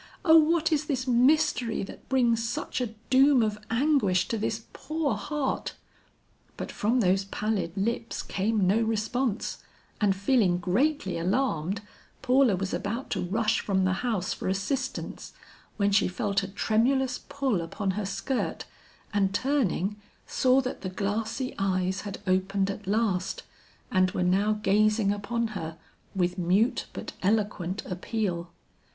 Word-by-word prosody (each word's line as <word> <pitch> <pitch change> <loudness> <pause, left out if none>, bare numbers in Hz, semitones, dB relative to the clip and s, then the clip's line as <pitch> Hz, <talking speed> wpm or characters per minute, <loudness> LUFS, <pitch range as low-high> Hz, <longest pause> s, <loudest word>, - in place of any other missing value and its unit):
O 320 -2 +7
what 325 +1 +4
is 305 -1 +1
this 260 -3 -1
mystery 255 -2 +3
that 195 - -11
brings 240 -4 +2
such 255 +2 -3
a 225 -3 -3 0.2
doom 265 -1 +6
of 210 -1 -1
anguish 225 -8 +2
to 230 - 0
this 220 +1 -2
poor 310 -4 -1
heart?" 265 +7 -2 0.8
But - - -5
from 235 +4 +1
those 190 0 +2
pallid 195 -3 -2
lips 230 +3 -2
came 205 0 0
no 205 +5 +3
response, 225 +1 -1 0.4
and 200 -2 +3
feeling 200 -3 +2
greatly 195 - 0
alarmed, 190 - 0 0.4
Paula 255 -4 +4
was 185 +1 -3
about 230 +6 -3
to - - 0
rush 215 +4 +1
from 190 -2 0
the 185 - +2
house 220 -7 -1
for - - -5
assistance, 260 +8 -3 0.4
when 200 -1 +2
she 200 - +4
felt 200 +1 0
a 195 - -4
tremulous 245 +6 +1
pull 265 -10 -1
upon 190 +4 -2
her 200 0 -3
skirt, 250 +6 -2 0.5
and 195 -1 +1
turning, 210 - 0 0.3
saw 260 +1 +3
that 255 - -5
the 185 - -3
glassy 220 +7 -2
eyes 190 -1 0
had 205 -2 -6
opened 190 +1 +1
at 200 0 -9
last 200 -3 0 0.5
and 185 0 +3
were 180 - -1
now 195 +4 +2
gazing 210 0 +3
upon 225 +3 -2
her 165 -6 -6 0.4
with 180 0 0
mute 205 +8 +2
but - - -7
eloquent 200 -2 0
appeal. 180 -2 -3
210 Hz, 145 wpm, -27 LUFS, 190-250 Hz, 0.8 s, O